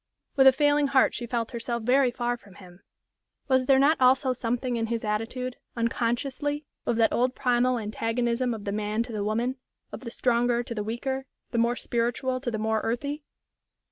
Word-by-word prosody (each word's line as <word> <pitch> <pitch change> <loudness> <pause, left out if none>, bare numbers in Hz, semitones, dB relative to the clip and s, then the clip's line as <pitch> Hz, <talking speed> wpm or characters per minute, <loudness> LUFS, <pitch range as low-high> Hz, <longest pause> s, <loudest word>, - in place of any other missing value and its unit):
With 270 -1 +6
a - - +10
failing 290 +1 +3
heart 270 -1 +4
she 240 - -5
felt 230 -1 -2
herself 235 -1 -3
very 255 +2 +4
far 240 0 -1
from 200 -5 -17
him. 180 -1 -15 0.7
Was 260 -2 +2
there 270 - +6
not 280 +2 +3
also 260 +1 +4
something 245 +1 -2
in 225 -1 -1
his 230 0 -2
attitude, 225 +4 -3 0.2
unconsciously, 260 +6 -1 0.2
of 240 - +2
that 225 0 +3
old 250 +1 +1
primal 250 -1 +2
antagonism 235 +2 -1
of 210 - -9
the 200 - -2
man 210 +2 -1
to 240 - -9
the 210 -1 -2
woman, 235 +5 -1 0.3
of - - -6
the 245 - -7
stronger 240 0 +1
to 235 - -6
the 210 -2 -3
weaker, 265 +5 -3 0.2
the 235 - 0
more 235 +1 +2
spiritual 245 +2 -1
to 255 - -2
the 225 - -2
more 220 0 0
earthy? 280 +6 -2
240 Hz, 190 wpm, -27 LUFS, 230-260 Hz, 0.7 s, a